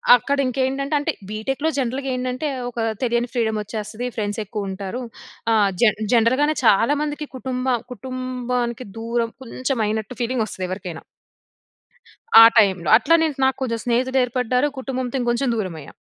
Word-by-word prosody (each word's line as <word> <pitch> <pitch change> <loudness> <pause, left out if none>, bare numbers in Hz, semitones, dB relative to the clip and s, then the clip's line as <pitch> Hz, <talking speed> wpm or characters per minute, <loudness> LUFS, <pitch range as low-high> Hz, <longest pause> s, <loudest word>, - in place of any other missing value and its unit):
అక్కడ 280 +3 0
ఇంకేండంటే 270 +3 -1
అంటే 290 - 0 0.2
బీటెక్‌లో 270 +8 -2
జనరల్‌గా 265 +1 -2
ఏందంటే 255 +3 -2 0.2
ఒక 240 - -15 0.3
తెలియని 240 0 0
ఫ్రీడమ్ 220 -3 0
వచ్చేస్తది. 215 +3 -5
ఫ్రెండ్స్ 210 0 -2
ఎక్కువ 205 -1 -4
ఉంటారు. 195 +6 -5 0.5
ఆహ్, 205 -2 +4
జన్ 215 -2 +4
జనరల్‌గానే 260 +7 +3
చాలామందికి 290 +8 +2
కుటుంబ 255 0 -3 0.2
కుటుంబానికి 250 0 -3
దూరం 230 0 -1
కొంచెం 255 +1 -3
అయినట్టు 220 +3 -3
ఫీలింగ్ 240 -1 0
వస్తది 185 -3 -5
ఎవరికైనా. 180 -3 -6 1.4
ఆ - - +12
టైమ్‌ల. 190 -5 +3
అట్ల 245 +8 +1
నే 325 - +3 0.2
నాకు 265 0 +2
కొంచెం 230 -3 -1
స్నేహితులు 255 +2 +1
ఏర్పడ్డారు, 250 +3 0
కుటుంబంతో 260 -1 -3
ఇంకొంచెం 240 +2 0
దూరం 185 -6 -3
అయ్యా. 140 - -12
245 Hz, 140 wpm, -22 LUFS, 220-260 Hz, 1.4 s, ఆ